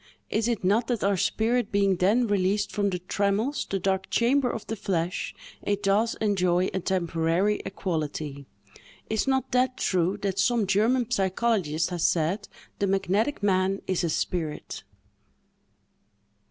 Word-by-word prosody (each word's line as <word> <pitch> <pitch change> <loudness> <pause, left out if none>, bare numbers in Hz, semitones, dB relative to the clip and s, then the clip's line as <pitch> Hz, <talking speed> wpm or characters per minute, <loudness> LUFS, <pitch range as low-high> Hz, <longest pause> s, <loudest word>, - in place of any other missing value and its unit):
Is 220 +1 +1
it 235 -5 -1
not 215 +5 +2
that 240 -4 -1
our 200 0 +3
spirit 220 +5 0
being 200 -2 +2
then 210 +8 +3
released 205 0 +1
from 205 -1 0
the 180 - -2
trammels—the 200 +6 -1
dark 190 0 -1
chamber 250 +2 +2
of 225 - -5
the 225 - -4
flesh—it 185 +2 -3
does 210 +4 +2
enjoy 185 -3 +1
a 190 - 0
temporary 175 +2 0
equality? 150 -5 -4 0.6
Is 220 +4 0
not 265 -1 0
that 255 +1 +2
true, 185 +1 +1
that 195 -1 -1
some 230 +2 +2
German 225 +5 +2
psychologist 190 -6 0
has 175 -2 -2
said—"_The 195 +4 -2
magnetic 200 +7 0
man 190 0 +1
is 185 -2 0
a 170 - +1
spirit! 160 -1 -3
195 Hz, 135 wpm, -26 LUFS, 180-220 Hz, 0.6 s, our